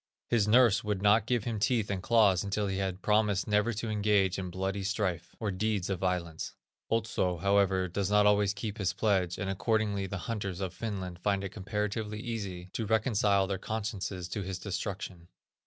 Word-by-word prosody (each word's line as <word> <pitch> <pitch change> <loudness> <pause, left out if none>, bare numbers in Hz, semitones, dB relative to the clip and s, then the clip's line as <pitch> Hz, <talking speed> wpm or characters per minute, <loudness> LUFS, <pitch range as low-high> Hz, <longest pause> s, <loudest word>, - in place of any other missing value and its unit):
His 110 -4 +3
nurse 115 -2 +5
would 105 -2 -2
not 105 +2 +4
give 120 -3 +1
him 115 -2 -2
teeth 110 -1 +1
and 95 -2 -2
claws 105 -3 +4
until 100 +1 -1
he 95 -1 -2
had 95 -1 -3
promised 105 -2 +2
never 105 +2 +2
to 110 +2 -4
engage 100 -3 +2
in 90 -1 -4
bloody 95 +2 -2
strife, 95 -4 -2
or 110 -3 -1
deeds 100 0 -1
of 95 - -1
violence. 90 -4 -2 0.3
Otso, 110 -5 0
however, 95 0 +2
does 95 +2 -2
not 105 0 +4
always 105 -1 +3
keep 105 +1 -5
his 95 -3 0
pledge, 95 -3 +1
and 100 - -3
accordingly 100 0 0
the 100 - -4
hunters 100 -5 -3
of 95 -2 -3
Finland 95 -4 -5
find 100 +1 0
it 95 - -3
comparatively 105 +2 -3
easy 100 -6 -5
to 110 - -2
reconcile 105 -3 +3
their 95 -1 -3
consciences 100 -4 -3
to 105 - -3
his 95 -1 -4
destruction. 95 -2 -5
100 Hz, 185 wpm, -30 LUFS, 95-105 Hz, 0.3 s, nurse